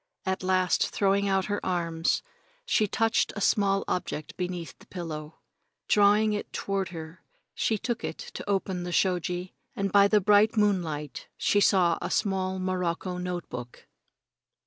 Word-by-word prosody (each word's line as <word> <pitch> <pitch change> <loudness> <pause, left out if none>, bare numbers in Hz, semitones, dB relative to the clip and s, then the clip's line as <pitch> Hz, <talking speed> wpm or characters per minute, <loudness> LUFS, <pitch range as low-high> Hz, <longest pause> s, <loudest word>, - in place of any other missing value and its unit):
At 190 0 -1
last, 185 0 +2
throwing 200 0 +1
out 195 -1 +1
her 205 0 -2
arms, 170 -2 0 0.4
she 215 - +2
touched 225 +3 +1
a - - -4
small 195 -1 +2
object 170 -4 -3
beneath 180 -2 -4
the - - -18
pillow. 160 -3 -6 0.5
Drawing 210 +1 +4
it 205 - -4
toward 195 -2 -2
her, 165 0 -9 0.3
she 220 - 0
took 235 +3 -3
it - - -4
to - - -8
the - - -8
open 185 -2 -1
shoji, 180 0 0 0.2
and 195 -1 -1
by 200 0 +6
the 210 +1 +4
bright 210 +3 +4
moonlight 170 -8 0
she 205 - +2
saw 180 -4 +4
a - - -3
small 190 -2 0
morocco 185 -1 -2
note 180 -1 -4
book. 120 0 -8
185 Hz, 150 wpm, -27 LUFS, 175-200 Hz, 0.5 s, by